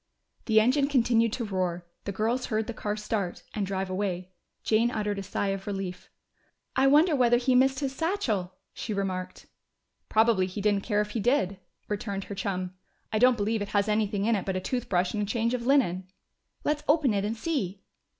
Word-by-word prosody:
The 220 Hz, -2 st, +5 dB
engine 260 Hz, +5 st, +3 dB
continued 235 Hz, -4 st, +3 dB
to 240 Hz, -, -2 dB
roar; 180 Hz, -3 st, -2 dB, 0.2 s
the 200 Hz, -, -2 dB
girls 225 Hz, +6 st, -1 dB
heard 220 Hz, 0 st, 0 dB
the 235 Hz, -, -5 dB
car 210 Hz, -1 st, -3 dB
start, 210 Hz, -4 st, -3 dB
and 205 Hz, -3 st, -2 dB
drive 190 Hz, 0 st, -2 dB
away. 185 Hz, -1 st, -3 dB, 0.3 s
Jane 225 Hz, +2 st, +3 dB
uttered 210 Hz, -3 st, -2 dB
a -, -, -3 dB
sigh 195 Hz, +1 st, -2 dB
of 195 Hz, 0 st, -4 dB
relief. 195 Hz, -3 st, -5 dB, 0.7 s
"I 270 Hz, -, +4 dB
wonder 305 Hz, +4 st, +5 dB
whether 240 Hz, -2 st, +4 dB
he 255 Hz, +1 st, +1 dB
missed 265 Hz, +2 st, +3 dB
his 270 Hz, -1 st, -2 dB
satchel," 240 Hz, -, -1 dB, 0.2 s
she 215 Hz, -, -4 dB
remarked. 185 Hz, -2 st, -3 dB, 0.6 s
"Probably 220 Hz, -4 st, +3 dB
he 185 Hz, +3 st, -6 dB
didn't 205 Hz, -1 st, +2 dB
care 210 Hz, -2 st, +1 dB
if 210 Hz, 0 st, -4 dB
he 230 Hz, -, -2 dB
did," 200 Hz, -5 st, +1 dB, 0.3 s
returned 200 Hz, -1 st, -3 dB
her 200 Hz, -, -7 dB
chum. 185 Hz, -2 st, -3 dB, 0.4 s
"I 215 Hz, -, +2 dB
don't 250 Hz, 0 st, +5 dB
believe 215 Hz, +1 st, 0 dB
it 205 Hz, -, -2 dB
has 200 Hz, -, +2 dB
anything 210 Hz, -1 st, +1 dB
in 230 Hz, 0 st, +3 dB
it 195 Hz, -, -1 dB
but 190 Hz, -, -2 dB
a -, -, 0 dB
toothbrush 185 Hz, -5 st, -1 dB
and 210 Hz, -, -1 dB
a -, -, 0 dB
change 230 Hz, +2 st, 0 dB
of 245 Hz, -1 st, -2 dB
linen." 190 Hz, -10 st, +2 dB, 0.6 s
"Let's 295 Hz, 0 st, 0 dB
open 295 Hz, -6 st, +4 dB
it 200 Hz, -1 st, 0 dB
and 220 Hz, +2 st, -2 dB
see." 210 Hz, -, -2 dB
210 Hz, 200 wpm, -28 LUFS, 195-240 Hz, 0.7 s, The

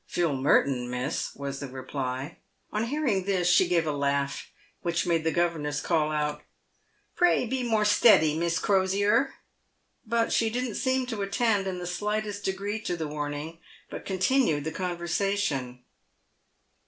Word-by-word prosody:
" -, -, -44 dB
Philip 160 Hz, -6 st, 0 dB
Merton, 130 Hz, -2 st, +2 dB
miss," 125 Hz, +4 st, -3 dB
was 140 Hz, -1 st, -5 dB
the 140 Hz, -, -5 dB
reply. 130 Hz, +2 st, -5 dB, 0.3 s
On 215 Hz, +2 st, -1 dB
hearing 240 Hz, -8 st, 0 dB
this 185 Hz, -3 st, +1 dB
she 180 Hz, 0 st, +5 dB
gave 170 Hz, -2 st, +2 dB
a 155 Hz, -, 0 dB
laugh, 140 Hz, -1 st, -1 dB, 0.3 s
which 170 Hz, 0 st, 0 dB
made 165 Hz, -2 st, +1 dB
the 160 Hz, -, +1 dB
governess 160 Hz, -4 st, 0 dB
call 155 Hz, -2 st, +1 dB
out, 150 Hz, -1 st, -1 dB, 0.4 s
" -, -, -42 dB
Pray 355 Hz, -7 st, +3 dB
be 255 Hz, +2 st, -2 dB
more 220 Hz, -3 st, +1 dB
steady, 205 Hz, -7 st, +5 dB
Miss 170 Hz, +1 st, 0 dB
Crosier 200 Hz, +7 st, +2 dB, 0.3 s
!" -, -, -46 dB, 0.3 s
but 230 Hz, +1 st, +1 dB
she 225 Hz, -, +2 dB
didn't 245 Hz, 0 st, -2 dB
seem 260 Hz, +1 st, 0 dB
to 225 Hz, -4 st, -4 dB
attend 200 Hz, 0 st, +1 dB
in 185 Hz, -1 st, -3 dB
the 180 Hz, -, -5 dB
slightest 210 Hz, +2 st, -2 dB
degree 200 Hz, +3 st, -2 dB
to 175 Hz, -5 st, -3 dB
the 160 Hz, -2 st, -3 dB
warning, 150 Hz, +2 st, -5 dB, 0.3 s
but -, -, -6 dB
continued 190 Hz, -, +1 dB
the 160 Hz, -, -3 dB
conversation. 170 Hz, -8 st, -2 dB
175 Hz, 160 wpm, -27 LUFS, 150-210 Hz, 0.4 s, she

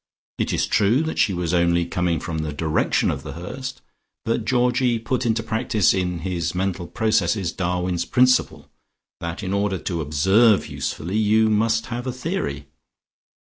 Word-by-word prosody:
It -, -, 0 dB
is -, -, +1 dB
true 110 Hz, +8 st, +2 dB
that 160 Hz, -, -3 dB
she 105 Hz, -, +3 dB
was 90 Hz, -2 st, -2 dB
only 85 Hz, 0 st, +2 dB
coming 85 Hz, -2 st, -1 dB
from 80 Hz, 0 st, -4 dB
the 75 Hz, -1 st, -3 dB
direction 80 Hz, +1 st, +1 dB
of -, -, -4 dB
The -, -, -8 dB
Hurst, 130 Hz, +10 st, -7 dB, 0.4 s
but 115 Hz, -1 st, -1 dB
Georgie 125 Hz, -1 st, +2 dB
put 120 Hz, +2 st, -2 dB
into 110 Hz, -1 st, 0 dB
practice, 110 Hz, -3 st, +1 dB
in 90 Hz, -3 st, -2 dB
his 90 Hz, -1 st, -2 dB
mental 90 Hz, -1 st, -2 dB
processes 105 Hz, -5 st, 0 dB
Darwin's 90 Hz, -1 st, -1 dB
principle, 125 Hz, +4 st, +2 dB, 0.5 s
that 85 Hz, +1 st, -5 dB
in 95 Hz, 0 st, -2 dB
order 100 Hz, -1 st, 0 dB
to 85 Hz, -2 st, -3 dB
observe 95 Hz, +9 st, +3 dB
usefully, 90 Hz, +6 st, -4 dB
you 110 Hz, +1 st, +3 dB
must 110 Hz, +1 st, +1 dB
have 120 Hz, 0 st, -5 dB
a -, -, 0 dB
theory. 125 Hz, -, -3 dB
100 Hz, 160 wpm, -22 LUFS, 85-115 Hz, 0.5 s, she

